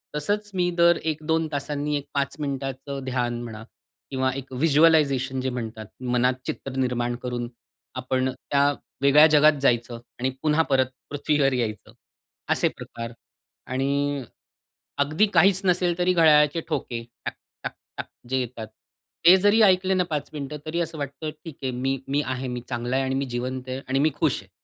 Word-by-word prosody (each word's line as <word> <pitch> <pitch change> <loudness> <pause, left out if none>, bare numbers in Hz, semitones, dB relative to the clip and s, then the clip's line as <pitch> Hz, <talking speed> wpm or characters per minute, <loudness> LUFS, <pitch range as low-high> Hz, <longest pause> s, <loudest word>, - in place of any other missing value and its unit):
तसंच 205 +8 -1
मी 180 -1 +1
दर 170 0 +5
1-2 160 +1 -1
तासांनी 145 +1 -2
एक 140 - -6
5 140 -1 -1
मिनिटाचं 135 -1 -4
ध्यान 120 -2 -1
म्हणा 110 -2 -8 0.5
किंवा 130 -1 +1
एक 135 -1 -7
व्हिज्युअलायझेशन 140 -2 +3
जे 130 - -1
म्हणतात. 115 -3 -5 0.2
मनात 125 0 +2
चित्र 135 - -5
निर्माण 125 -2 0
करून 120 -1 -3 0.5
आपण 130 0 0
त्या 140 +2 +1 0.3
वेगळ्या 140 +2 +7
जगात 155 0 +6
जायचं 120 -2 +1 0.2
आणि 130 +1 +1
पुन्हा 155 +1 +3
परत 130 -1 +4 0.2
पृथ्वीवर 145 -1 +1
यायचं. 110 -5 -3 0.6
असे - - +3
प्रकार 115 -1 -7 0.6
आणि 140 +2 0 0.8
अगदी 155 +9 +2
काहीच 185 +3 +5
नसेल 180 -1 +2
तरी 180 0 +2
घड्याळाचे 155 -2 +5
ठोके 125 -6 -3 0.2
टक-टक-टक - - -8 0.2
जे 130 - +1
येतात. 120 -3 -5 0.6
ते 175 +2 +10
जरी 205 +4 +4
ऐकले 185 -1 +4
ना, 185 -1 +2
5 155 -5 -4
मिनिटं 150 0 -5
तरी 160 +2 -2
असं 165 -1 -4
वाटतं, 145 +2 -4
"ठीक 165 -4 -8
आहे 130 - 0
मी, 135 +2 -1
मी 140 +2 +1
आहे 130 0 -3
मी 125 -1 -4
चांगला 120 0 -2
आहे 135 0 +1
आणि 130 0 -1
मी 135 +1 0
जिवंत 130 +1 -3
आहे 130 +1 -3
आणि 135 +1 +1
मी 155 +3 +4
खुश - - +1
आहे." - - -21
140 Hz, 160 wpm, -25 LUFS, 130-155 Hz, 0.8 s, ते